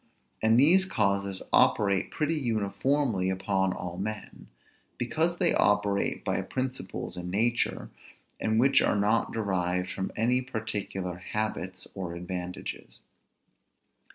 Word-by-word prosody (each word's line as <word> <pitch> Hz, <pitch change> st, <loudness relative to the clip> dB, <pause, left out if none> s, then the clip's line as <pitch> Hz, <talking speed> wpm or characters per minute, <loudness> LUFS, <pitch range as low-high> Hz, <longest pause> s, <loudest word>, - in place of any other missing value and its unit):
And 110 Hz, +2 st, +4 dB
these 180 Hz, +8 st, +6 dB
causes 100 Hz, -, 0 dB
operate 100 Hz, -2 st, +3 dB
pretty 155 Hz, +1 st, -1 dB
uniformly 115 Hz, -, 0 dB
upon 95 Hz, 0 st, 0 dB
all 90 Hz, 0 st, -5 dB
men, 110 Hz, +2 st, -5 dB, 0.5 s
because 160 Hz, +8 st, 0 dB
they 175 Hz, -2 st, +3 dB
operate 100 Hz, -1 st, +1 dB
by -, -, 0 dB
principles 130 Hz, -7 st, -4 dB
in 90 Hz, 0 st, -5 dB
nature, 115 Hz, +5 st, 0 dB, 0.5 s
and 110 Hz, 0 st, +1 dB
which 135 Hz, +3 st, +5 dB
are -, -, +2 dB
not 105 Hz, +3 st, +2 dB
derived 90 Hz, -4 st, -1 dB
from 95 Hz, -, -3 dB
any 125 Hz, +3 st, +2 dB
particular 105 Hz, -7 st, -4 dB
habits 95 Hz, -1 st, -4 dB
or 90 Hz, -3 st, -5 dB
advantages. 90 Hz, +1 st, -6 dB
105 Hz, 115 wpm, -28 LUFS, 95-120 Hz, 0.5 s, these